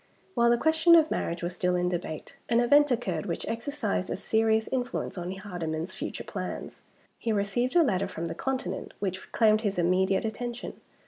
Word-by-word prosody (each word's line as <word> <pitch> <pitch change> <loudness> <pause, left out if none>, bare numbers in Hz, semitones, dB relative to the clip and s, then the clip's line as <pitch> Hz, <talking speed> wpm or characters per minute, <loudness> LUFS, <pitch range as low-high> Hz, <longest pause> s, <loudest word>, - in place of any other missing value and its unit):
While 235 -5 +4
the 240 - +4
question 320 +4 +5
of 315 -2 +5
marriage 170 +1 -2
was 175 +1 -2
still 180 0 0
in 180 0 +1
debate, 175 -3 -4
an 235 - +4
event 290 +5 +5
occurred 190 - -1
which 170 - -3
exercised 230 -5 -2
a - - -1
serious 220 +2 +2
influence 250 -2 -2
on 175 -1 -4
Hardyman's 175 -4 -4
future - - -5
plans. - - -6 0.4
He 230 - -1
received 215 - 0
a 345 - +7
letter 195 -7 +1
from 170 -3 -5
the 165 - -3
Continent 225 -4 -3
which 190 -2 -4
claimed 215 -1 +4
his 205 -4 -1
immediate 190 +3 +2
attention. 240 +2 -5
205 Hz, 180 wpm, -28 LUFS, 180-240 Hz, 0.4 s, a